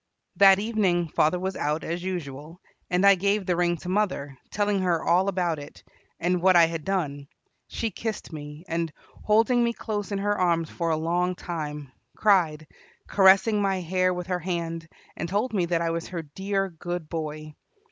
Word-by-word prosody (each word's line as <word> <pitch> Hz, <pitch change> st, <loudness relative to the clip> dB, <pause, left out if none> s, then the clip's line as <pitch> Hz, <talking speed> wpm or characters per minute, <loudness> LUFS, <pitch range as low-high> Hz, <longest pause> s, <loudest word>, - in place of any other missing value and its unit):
That 195 Hz, -1 st, +8 dB
evening 195 Hz, -6 st, 0 dB
father 155 Hz, +4 st, +2 dB
was 190 Hz, +1 st, -3 dB
out 150 Hz, +2 st, -1 dB
as 170 Hz, +2 st, -3 dB
usual, 165 Hz, -3 st, -6 dB, 0.3 s
and 180 Hz, +2 st, +2 dB
I 200 Hz, -, +9 dB
gave 200 Hz, +1 st, 0 dB
the 180 Hz, -, +1 dB
ring 175 Hz, 0 st, +1 dB
to 170 Hz, -, -10 dB
mother, 185 Hz, -9 st, -1 dB
telling 205 Hz, -1 st, 0 dB
her 175 Hz, -3 st, +1 dB
all 180 Hz, +3 st, +3 dB
about 175 Hz, -5 st, 0 dB
it, 145 Hz, -, -12 dB, 0.4 s
and 175 Hz, +1 st, 0 dB
what 185 Hz, 0 st, +5 dB
I 170 Hz, -1 st, +8 dB
had 165 Hz, -1 st, -4 dB
done. 145 Hz, -7 st, -2 dB, 0.4 s
She 225 Hz, -1 st, -3 dB
kissed 220 Hz, -6 st, -5 dB
me, 150 Hz, +2 st, -8 dB
and, 165 Hz, -1 st, -2 dB, 0.3 s
holding 230 Hz, +3 st, +4 dB
me 235 Hz, 0 st, +1 dB
close 210 Hz, -3 st, -4 dB
in 200 Hz, -, -1 dB
her 205 Hz, +1 st, 0 dB
arms 170 Hz, -4 st, +1 dB
for 170 Hz, -1 st, -2 dB
a 160 Hz, -, +1 dB
long 175 Hz, +3 st, 0 dB
time, 150 Hz, -6 st, -6 dB, 0.3 s
cried, 170 Hz, -7 st, +3 dB, 0.4 s
caressing 200 Hz, +2 st, +5 dB
my 195 Hz, -1 st, +1 dB
hair 185 Hz, +1 st, +1 dB
with 180 Hz, -1 st, -4 dB
her 180 Hz, 0 st, -2 dB
hand, 165 Hz, -1 st, -4 dB, 0.3 s
and 170 Hz, -, -4 dB
told 215 Hz, +6 st, -1 dB
me 180 Hz, -4 st, +1 dB
that 170 Hz, -1 st, 0 dB
I 165 Hz, -, 0 dB
was 165 Hz, 0 st, -3 dB
her 170 Hz, -3 st, -5 dB
dear, 195 Hz, +6 st, -2 dB
good 175 Hz, -1 st, -5 dB
boy. 155 Hz, -1 st, -5 dB
180 Hz, 185 wpm, -26 LUFS, 165-195 Hz, 0.4 s, I